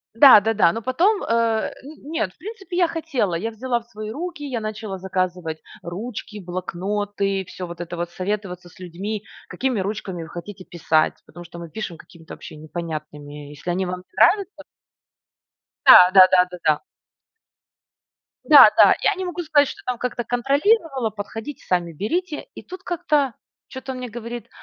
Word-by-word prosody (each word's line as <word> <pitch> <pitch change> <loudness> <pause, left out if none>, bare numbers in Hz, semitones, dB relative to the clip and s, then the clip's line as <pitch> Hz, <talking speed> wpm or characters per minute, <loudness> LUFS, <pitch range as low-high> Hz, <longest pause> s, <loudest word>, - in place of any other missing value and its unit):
Да-да-да. 220 -8 +7
Но 230 - -4
потом, 360 - +2
э, - - -6 0.6
н 300 +3 -11
нет, 215 - -1
в - - -35
принципе, 385 -1 -7
я 350 -2 +4
хотела, 295 - -2
я 225 +7 -3
взяла 240 +2 -2
в - - -23
свои 215 -1 -8
руки, 325 +1 -6
я 250 -4 -3
начала 215 -2 -5
заказывать 180 -3 -3 0.2
ручки, 210 +4 -6
блокноты, 195 +2 -3
всё 180 -1 -7
вот 170 0 -8
это 175 0 -6
вот, 175 0 -3
советоваться 185 -2 -4
с 185 - -20
людьми: 195 +4 -5 0.2
"Какими 255 -5 -2
ручками 190 -3 -4
вы - - -11
хотите 185 +2 -9
писать?". 160 -2 +1
Потому 175 +2 -12
что 170 0 -11
мы 170 -1 -8
пишем 180 -4 -6
какими-то 165 -1 -14
вообще - - -11
непонятными. 150 -2 -7
"Если 150 +4 -8
они 185 +2 0
вам 180 0 -4
не 180 - -21
нравятся" 385 - +4 1.3
Да 180 0 +10
да 190 -1 +10
да 180 0 +6
да 180 - -7
да. 155 -1 +3 1.7
Да-да. - - +8
Я 405 - +3
не 375 - -4
могу 355 0 -4
сказать, 295 -3 +3
что - - -8
там 250 -1 -2
как-то 245 -1 -3
контролировала: 275 - +1
подходите, 220 +6 -7
сами 175 -2 0
берите". 310 - -3
И - - -9
тут 370 +1 -10
как-то 300 -7 0 0.3
чё-то 265 0 -7
он 255 - -6
мне 250 -1 -6
говорит: 235 +1 -7
210 Hz, 165 wpm, -22 LUFS, 180-265 Hz, 1.7 s, Да